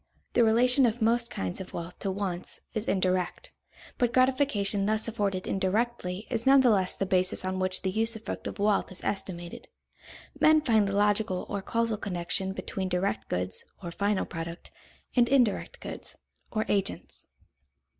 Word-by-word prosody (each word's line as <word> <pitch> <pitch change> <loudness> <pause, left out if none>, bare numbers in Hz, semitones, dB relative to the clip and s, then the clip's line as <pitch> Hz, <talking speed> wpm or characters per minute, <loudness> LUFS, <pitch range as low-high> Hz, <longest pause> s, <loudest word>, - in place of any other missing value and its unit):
The 240 - +5
relation 245 +3 +5
of 230 +1 -2
most 235 +1 +2
kinds 95 - -4
of 185 - -9
wealth 170 +1 -6
to 195 - -2
wants 190 -2 -4
is 220 -1 -3
indirect; 185 -2 0 0.5
but 245 -1 +2
gratification 255 -7 +2
thus 220 +1 +1
afforded 200 -4 -1
indirectly 195 0 -1
is 235 0 0
none 270 0 +7
the 250 -3 +5
less 190 -3 +2
the 195 - -1
basis 185 0 +1
on 185 0 -2
which 185 0 0
the 190 - 0
usufruct 225 +2 -2
of - - -6
wealth 205 -1 +1
is 185 - -6
estimated. 175 -3 -4 0.7
Men 310 0 +6
find 220 -7 +3
the 200 - -2
logical 205 -2 +1
or 200 -1 -3
causal 230 +1 0
connection 190 0 -2
between 190 -1 -4
direct 180 - -1
goods, 90 0 -2 0.2
or 170 - -5
final 200 +3 0
product, 170 0 -7 0.4
and 240 -2 +4
indirect 250 -6 +2
goods, - - -7 0.3
or 215 -1 -1
agents. 195 -1 -2
200 Hz, 160 wpm, -28 LUFS, 185-230 Hz, 0.7 s, none